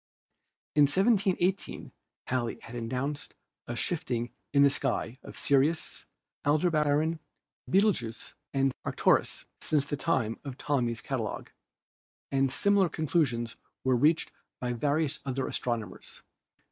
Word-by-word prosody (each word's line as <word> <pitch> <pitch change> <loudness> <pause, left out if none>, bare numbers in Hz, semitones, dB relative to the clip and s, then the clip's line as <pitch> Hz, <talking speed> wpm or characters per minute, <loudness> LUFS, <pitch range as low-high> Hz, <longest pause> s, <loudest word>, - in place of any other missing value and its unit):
In 150 -1 +7
1718 190 +1 +1 0.3
Halley 120 -2 -1
had 120 - -9
announced 130 +5 -3 0.3
a 120 - -3
shifting 120 -5 -2 0.2
in 140 0 +5
the 140 - +6
sky 130 -2 -1
of - - -11
Sirius, 145 +4 +1 0.4
Aldebaran, 155 0 +2 0.5
Betelgeux 185 - +1 0.2
and 135 -1 +2
Arcturus - - +2
since 145 -3 +1
the 145 - -2
time 125 -7 0
of 135 -3 -7
Ptolemy's 125 -5 0
catalogue, 120 -6 -3 0.8
and 135 -1 +2
similar 200 +2 +3
conclusions 135 -8 0 0.3
were 130 -1 +3
reached 155 +6 +3 0.3
by 125 -1 -1
various 145 +4 +1
other 135 -1 -2
astronomers. 115 -3 -4
140 Hz, 110 wpm, -29 LUFS, 125-155 Hz, 0.8 s, In